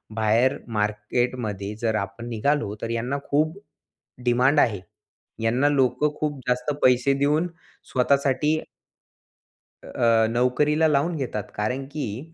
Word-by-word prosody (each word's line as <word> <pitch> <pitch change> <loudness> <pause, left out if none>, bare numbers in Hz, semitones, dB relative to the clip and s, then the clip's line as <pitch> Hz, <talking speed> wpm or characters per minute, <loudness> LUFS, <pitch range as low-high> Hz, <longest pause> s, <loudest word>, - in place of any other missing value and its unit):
बाहेर 115 +6 +2 0.2
मार्केटमध्ये 105 -1 -2
जर 110 -2 +1
आपण 100 +4 -4
निघालो, 115 -1 0
तर 115 - -3
यांना 120 +4 -2
खूप 155 +5 +1 0.7
डिमांड 130 +4 +4
आहे. 105 -8 +2 0.6
यांना 125 +6 +3
लोकं 140 +1 +1
खूप 150 -2 -1
जास्त 125 +4 0
पैसे 125 +2 +4
देऊन 150 +5 +2 0.4
स्वतःसाठी 140 +3 +2 1.3
अ, 115 -1 +2
नोकरीला 145 +7 +2
लावून 150 +3 +1
घेतात 120 -8 -3
कारण 125 +6 -2
की 145 +2 -5
125 Hz, 110 wpm, -24 LUFS, 115-145 Hz, 1.3 s, डिमांड